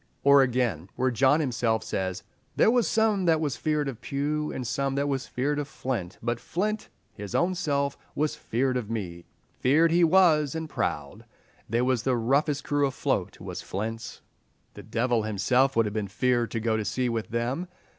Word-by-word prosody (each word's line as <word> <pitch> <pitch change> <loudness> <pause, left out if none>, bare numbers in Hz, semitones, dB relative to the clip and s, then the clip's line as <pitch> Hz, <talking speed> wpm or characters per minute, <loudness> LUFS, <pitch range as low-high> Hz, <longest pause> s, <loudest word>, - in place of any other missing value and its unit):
Or, 140 0 +7
again, 120 -9 0
where 130 +1 +1
John 135 +6 +3
himself 115 -5 0
says, 95 -1 -3 0.3
"there 220 - +5
was 245 -2 +2
some 215 -4 +2
that 165 -2 +4
was 150 -4 -1
feared 150 -2 0
of 130 -3 -6
Pew, 150 +2 -2
and 130 - -5
some 135 +3 -1
that 140 +1 0
was 135 -2 -2
feared 145 +4 -1
of 145 - -3
Flint; 120 -11 -4
but 120 0 -1
Flint 210 - -2 0.2
his 100 -1 -7
own 175 +2 +2
self 140 -6 -1 0.2
was 150 +1 0
feared 130 +2 -1
of 115 -4 -4
me. 90 -7 -5 0.3
Feared 160 +6 +4
he 175 +1 +4
was, 160 -4 +4
and 160 0 -3
proud. 75 - -3 0.4
They 115 +3 +1
was 125 -2 +1
the 130 -1 +1
roughest 140 +5 +1
crew 145 -1 +1
afloat 135 - -2
was - - -6
Flint's. 115 +4 -5 0.5
The - - -10
devil 115 +2 0
himself 115 +6 +2
would 115 -1 +3
have 105 - -3
been 105 -2 -2
feared 120 +5 +1
to 115 - -3
go 110 0 0
to 110 - -1
sea 125 +4 -1
with 115 -2 -2
them. 120 +9 -2
130 Hz, 185 wpm, -27 LUFS, 115-150 Hz, 0.5 s, Or